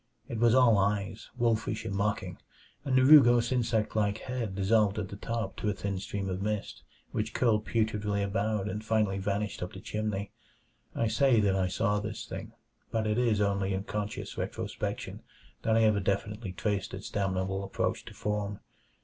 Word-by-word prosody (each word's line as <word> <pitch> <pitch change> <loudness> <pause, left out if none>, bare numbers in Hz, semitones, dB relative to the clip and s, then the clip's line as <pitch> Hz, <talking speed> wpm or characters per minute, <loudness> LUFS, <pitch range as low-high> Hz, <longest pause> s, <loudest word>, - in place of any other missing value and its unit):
It 115 - -4
was 120 0 +5
all 120 -5 +6
eyes 100 +1 -1
wolfish 115 -2 0
and 105 - -3
mocking 100 -3 -1 0.4
and 135 -3 0
the 130 - +5
rugose 120 -4 +7
insect 115 -4 0
like 105 -1 +1
head 120 -6 -4
dissolved 100 +1 +3
at 100 -3 -3
the - - -7
top 115 +3 -3
to 105 - -1
a - - +1
thin 100 -1 -3
stream 100 0 -4
of 95 0 -3
mist 105 0 -3 0.3
which 110 +1 -2
curled 110 -4 +2
putridly 105 -2 0
about 100 0 -1
and 105 +2 -4
finally 110 -3 +1
vanished 100 +1 -2
up 90 - -4
the 95 - -8
chimney. 105 -1 -3 0.6
I 115 - +1
say 130 0 +4
that 100 -2 +2
I 95 -1 +1
saw 105 +2 +1
this 105 +1 -5
thing, - - -7 0.4
but 110 -1 -1
it 105 +2 +1
is 115 -4 +2
only 100 -1 +1
in 95 - -3
conscious 105 0 -4
retrospection - - -4 0.4
that 110 0 +2
I 115 - +4
ever 110 -2 +4
definitely 100 +1 -2
traced 100 0 -2
its 95 - -8
damnable 95 -1 -1
approach 100 - -2
to - - -11
form. 105 -1 -2
105 Hz, 180 wpm, -30 LUFS, 100-110 Hz, 0.6 s, rugose